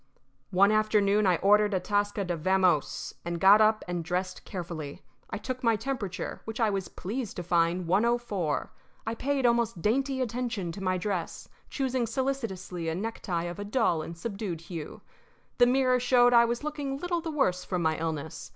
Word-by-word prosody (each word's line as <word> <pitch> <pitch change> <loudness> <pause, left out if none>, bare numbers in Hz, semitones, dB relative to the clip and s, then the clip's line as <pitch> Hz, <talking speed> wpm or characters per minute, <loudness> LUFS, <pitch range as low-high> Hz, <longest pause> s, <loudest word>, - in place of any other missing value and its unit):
One 200 +3 +4
afternoon 215 -1 +3
I 180 - +4
ordered 205 +3 +4
Atasca 205 +2 0
to 175 - +1
vamose, 180 -2 +1
and 170 0 -3
got 200 +4 +7
up 215 0 +3
and 175 -1 -2
dressed 180 +2 -3
carefully. 170 -7 -6 0.3
I - - -3
took 255 +4 -5
my 230 -1 +4
temperature, 210 -6 -4
which 220 +1 -6
I 220 -3 +3
was 195 -2 -2
pleased 225 +3 -5
to 180 - -4
find 170 +1 +1
104. 205 -4 0 0.3
I 225 - -2
paid 270 +2 -1
almost 235 -7 +1
dainty 265 +5 +1
attention 235 -7 -2
to 195 - -8
my 185 0 +1
dress, 180 -2 -4 0.2
choosing 260 -3 -1
solicitously 225 -9 -3
a 160 - -2
necktie 185 -4 -3
of 175 +2 -5
a - - -3
dull 205 -6 +1
and 165 +2 -7
subdued 195 -3 -4
hue. 165 -3 -7 0.6
The 245 - +7
mirror 255 0 +3
showed 245 0 +4
that 235 - +8
I 235 - +6
was 235 +3 -2
looking 290 -3 -3
little 345 +2 -2
the 330 - -4
worse 185 - +1
from 180 -2 -2
my 160 0 +2
illness. 160 -1 -4
205 Hz, 180 wpm, -28 LUFS, 180-240 Hz, 0.6 s, that